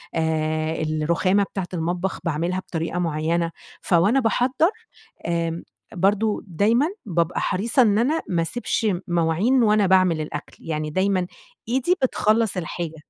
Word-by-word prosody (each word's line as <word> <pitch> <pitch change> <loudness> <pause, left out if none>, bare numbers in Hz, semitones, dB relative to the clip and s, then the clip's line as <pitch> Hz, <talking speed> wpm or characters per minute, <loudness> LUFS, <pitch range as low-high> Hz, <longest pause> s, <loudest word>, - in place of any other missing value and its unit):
آآ، 155 0 -1
الرُخامة 170 +6 +1
بتاعة 190 -2 -4
المطبخ 175 +3 -2
باعملها 170 +3 -1
بطريقة 175 -1 -4
معيّنة، 165 +1 0 0.3
ف - - -3
وأنا 200 +10 +4
باحضّر، 255 +6 +2 0.6
آمم، 170 0 -1 0.3
برضه 205 +4 +1
دايمًا 220 - +2 0.2
بابقى 170 -2 0
حريصة 235 +7 +1
إن 210 -2 +3
أنا 290 +8 +1
ما 170 -2 +1
اسيبش 225 +4 -2 0.2
مواعين 175 +10 +2
وأنا 210 -2 +4
باعمِل 185 -4 +3
الأكل، 150 -1 -6
يعني 155 -1 -3
دايمًا 185 +1 +1 0.4
إيدي 265 +8 +2
بتخلّص 220 -4 +2
الحاجة. 165 -1 -4
180 Hz, 130 wpm, -23 LUFS, 165-215 Hz, 0.6 s, وأنا